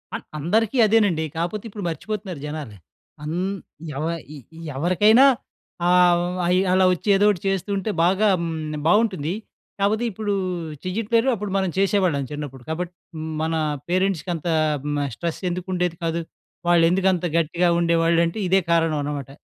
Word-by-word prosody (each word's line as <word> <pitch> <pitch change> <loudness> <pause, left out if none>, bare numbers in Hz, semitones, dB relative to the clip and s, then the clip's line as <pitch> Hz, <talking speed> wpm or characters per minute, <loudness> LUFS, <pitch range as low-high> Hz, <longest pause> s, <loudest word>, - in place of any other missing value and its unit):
అన్ - - -6 0.2
అందరికీ 220 - +1
అదేనండి. 205 -7 +3
కాపోతే 175 +5 -2
ఇప్పుడు 205 -1 -7
మర్చిపోతున్నారు 190 0 -5
జనాలు. 150 -8 -6 0.5
అన్ 155 +3 -3 0.6
ఎవ 150 - -2 0.3
ఇ - - -8 0.4
ఎవరికైనా 210 - +5 0.6
ఆహ్, 180 -1 +5
హ్మ్, 175 +1 -2
అయ్యి 180 +2 +3
అలా 185 0 +4
ఒచ్చి, 180 +3 -2
ఏదోటి 205 -1 +3
చేస్తూంటే, 195 +1 -1 0.2
బాగా 195 +4 +3
హ్మ్, 170 -1 -2 0.3
బావుంటుంది. 185 -5 +2 0.5
కాపోతే 210 +4 +1
ఇప్పుడూ 205 +1 -2 0.5
చెయ్యట్లేరు, 225 +6 0
అప్పుడు 210 -3 -4
మనం 190 -1 0
చేసేవాళ్ళం, 190 -7 +2
చిన్నప్పుడు. 145 -4 -7
కాబట్ 170 +2 -3 0.2
హ్మ్, 155 0 -5
మన 160 +1 0 0.3
పేరెంట్స్‌కి 185 -1 0
అంత 165 +1 -6 0.4
హ్మ్, 145 0 -2
ఆహ్, 140 - -3
స్ట్రెస్ 170 +2 -4
ఎందుకుండేది 180 -1 -2
కాదు? 165 0 -1 0.5
వాళ్ళేందుకంత 175 +2 +3
గట్టిగా 170 +2 +1
ఉండేవాళ్ళుంటే, 170 +1 +2
ఇదే 190 +2 +4
కారణం 165 -2 +2
అనమాట. 145 -3 -4
180 Hz, 135 wpm, -23 LUFS, 165-195 Hz, 0.6 s, ఎవరికైనా